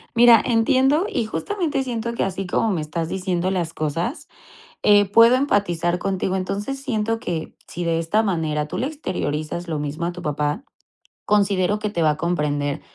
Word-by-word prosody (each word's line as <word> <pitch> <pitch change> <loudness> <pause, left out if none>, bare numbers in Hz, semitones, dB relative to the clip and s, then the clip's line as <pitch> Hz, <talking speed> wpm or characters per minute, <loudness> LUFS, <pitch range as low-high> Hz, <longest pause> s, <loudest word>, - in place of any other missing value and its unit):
Mira, 235 -2 +7
entiendo. 260 - +3
Y, 245 - -1
justamente 310 - -2
siento 235 -2 -3
que - - -1
así 195 0 -3
como 220 +4 +1
me 170 - -1
estás 160 +2 -3
diciendo 185 -1 -1
las 170 -3 -2
cosas, 165 - -3 0.6
eh, 205 0 +6
puedo 230 +4 +7
empatizar 180 - +1
contigo. 190 0 -1
Entonces, 205 +8 -3
siento 225 -4 -1
que, 165 -6 -4
si 175 - -5
de 165 -1 0
esta 210 +7 +1
manera, 155 -6 -1
tú - - -5
le 260 - 0
exteriorizas 170 - -4
lo 160 -3 -2
mismo 150 +3 -3
a 175 - -1
tu 180 0 -9
papá, 150 - -2 0.6
considero 200 -1 +2
que 210 0 -3
te 170 -5 -1
va 155 - +4
a 150 - -1
comprender, 150 -4 -1
190 Hz, 175 wpm, -22 LUFS, 165-230 Hz, 0.6 s, Mira